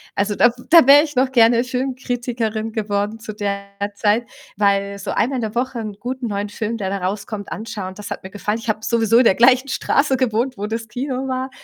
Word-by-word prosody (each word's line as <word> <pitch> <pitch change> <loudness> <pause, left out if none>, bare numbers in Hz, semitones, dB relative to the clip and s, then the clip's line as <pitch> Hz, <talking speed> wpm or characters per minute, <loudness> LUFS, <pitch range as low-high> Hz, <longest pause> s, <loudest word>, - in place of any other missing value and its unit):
Also 205 0 0
da 240 - +5 0.2
da 330 -5 +7
wär 290 +2 +8
ich 295 -2 -6
noch 260 +1 +2
gerne 235 -1 +5
Filmkritikerin 245 -4 -3
geworden 210 0 -2
zu 215 -1 -7
der 200 -1 -3 0.3
Zeit, 215 +3 +1 0.3
weil 200 -1 +1
so 195 - -4
einmal 260 +3 0
in - - -2
der 220 -1 -3
Woche 250 0 -1
'n 215 -2 -5
guten 250 +2 -4
neuen 205 -1 -3
Film, 225 +2 -3
der 195 -4 -3
da 195 0 -2
rauskommt, 205 +1 -4
anschauen, 205 -4 -5
das 205 0 -8
hat - - -6
mir 190 - -8
gefallen. 210 +2 -3
Ich 230 0 -7
habe 215 - 0
sowieso 230 -1 +2
in 250 - +5
der 190 - +5
gleichen 255 +3 +5
Straße 280 0 +1
gewohnt, 250 +1 0
wo 205 - -3
das 225 +1 -4
Kino 255 +3 -4
war. 260 0 -2
225 Hz, 215 wpm, -20 LUFS, 205-255 Hz, 0.3 s, wär